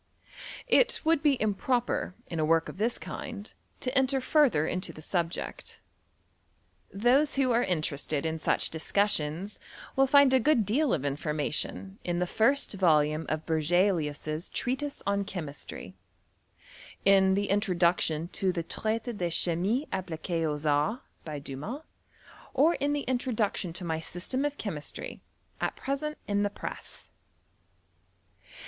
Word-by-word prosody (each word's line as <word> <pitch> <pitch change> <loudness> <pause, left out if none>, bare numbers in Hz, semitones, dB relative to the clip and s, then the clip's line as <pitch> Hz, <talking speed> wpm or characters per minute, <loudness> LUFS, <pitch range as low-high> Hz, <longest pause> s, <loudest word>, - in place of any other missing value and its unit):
It - - +4
would 320 -2 +3
be 295 -2 +4
im 215 -5 0
proper, 240 -3 -1
in 165 - -5
a - - +2
work 165 +1 +3
of - - -10
this 230 +3 +1
kind, 220 -5 -7 0.3
to 255 +1 -2
enter 265 0 +3
further 255 - +3
into 180 +3 -2
the - - -12
subject. 170 +1 -3 1.1
Those 250 +9 +3
who 265 -2 +2
are 235 +1 +3
interested 155 - 0
in 160 0 -1
such - - 0
dis 160 -1 -6
cussions 195 -1 0 0.4
will 270 0 +4
find 280 -1 +6
a 260 - +6
g^ood 250 -4 +3
deal 260 +7 +2
of 140 - -4
information 150 +7 -2
in 175 -1 -1
the 180 - +1
first 230 +10 +2
volume 155 -4 +2
of 155 0 -2
Berzeliiis's 160 -1 0
Treatise 280 +3 -2
on 200 0 +1
Chemistry, 165 -7 -7 1.1
in 190 -1 +5
the 200 0 0
introduction 175 -5 +2
to 190 -1 0
the 170 -2 -3
Traite 220 +6 -2
de 175 -3 -1
Chimie 185 - +1
appli(iu4 170 -2 -2
aux 150 0 -2
Arts, 150 - +1 0.2
by 155 -2 -5
Dumas, 145 - -6 0.7
or 305 +6 +5
in 290 -2 0
the 290 - 0
introduction 235 -8 -1
to 180 +1 -5
my 160 -1 -1
System 180 - -2
of 290 0 -2
Chemistry, - - -6 0.4
at - - -1
present 300 +3 -3
in 205 0 +1
the 205 - +1
press. - - -8
195 Hz, 140 wpm, -29 LUFS, 160-255 Hz, 1.1 s, find